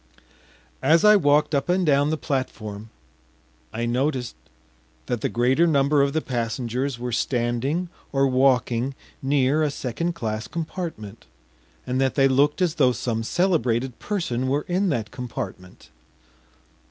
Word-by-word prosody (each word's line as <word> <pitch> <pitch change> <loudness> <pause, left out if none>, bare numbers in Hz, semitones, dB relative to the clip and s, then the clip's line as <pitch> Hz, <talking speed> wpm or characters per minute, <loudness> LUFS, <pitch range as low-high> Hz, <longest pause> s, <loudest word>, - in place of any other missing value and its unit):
As 160 +7 +4
I 210 0 +8
walked 150 -5 +3
up 140 +4 0
and 180 0 +2
down 145 -1 +3
the 160 - 0
platform 110 -7 -4 0.8
I 115 +1 -3
noticed 125 - -1 0.7
that 120 -3 -2
the - - 0
greater 130 +8 +2
number 140 -1 +3
of 140 0 +1
the 160 - -1
passengers 120 +2 -2
were 125 0 -4
standing 120 +8 -1 0.2
or 135 0 +2
walking 130 -1 +2 0.3
near 140 +2 +2
a 155 - +2
second 145 +6 -3
class 110 -6 -3
compartment, 160 - -6 0.6
and 130 +1 -1
that 135 -1 +1
they 135 -1 +5
looked 145 +6 +2
as 170 -4 +1
though 125 -2 +5
some 115 -1 -2
celebrated 130 -5 0
person 130 - -2
were 140 +3 0
in 185 +2 +1
that 115 -8 -2
compartment. 110 -7 -7
135 Hz, 140 wpm, -24 LUFS, 120-150 Hz, 0.8 s, I